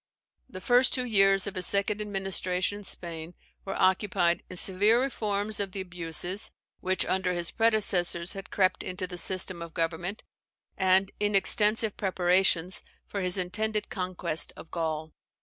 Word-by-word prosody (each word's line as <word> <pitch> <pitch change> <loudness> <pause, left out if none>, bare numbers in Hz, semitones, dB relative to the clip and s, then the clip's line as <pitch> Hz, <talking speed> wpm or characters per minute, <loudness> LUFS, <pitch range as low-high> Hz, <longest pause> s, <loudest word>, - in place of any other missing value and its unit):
The 185 -7 -9
first 245 +5 +4
two 255 -1 0
years 195 -4 +4
of 200 - -4
his 185 -1 +1
second 200 +1 0
administration 195 -1 -1
in - - -11
Spain 170 -1 -6 0.3
were 195 - -4
occupied 185 -2 +2
in 185 - -9
severe 205 +6 +2
reforms 215 -5 -1
of 195 -2 -2
the 195 - -3
abuses 175 +1 -1 0.3
which 185 -1 0
under 185 -1 0
his 175 -1 -1
predecessors 195 -6 +1
had 195 -1 -8
crept 185 -2 +1
into 185 0 -4
the 180 -1 -3
system 185 0 +1
of 170 -1 -9
government, 170 +5 -3 0.5
and 190 +1 +3
in 205 0 +1
extensive 210 +2 +3
preparations 185 -1 +2 0.2
for 200 - -5
his 180 +1 0
intended 210 +4 -1
conquest 180 -4 -1
of 160 - -13
Gaul. 160 -2 -3
190 Hz, 150 wpm, -28 LUFS, 180-205 Hz, 0.5 s, first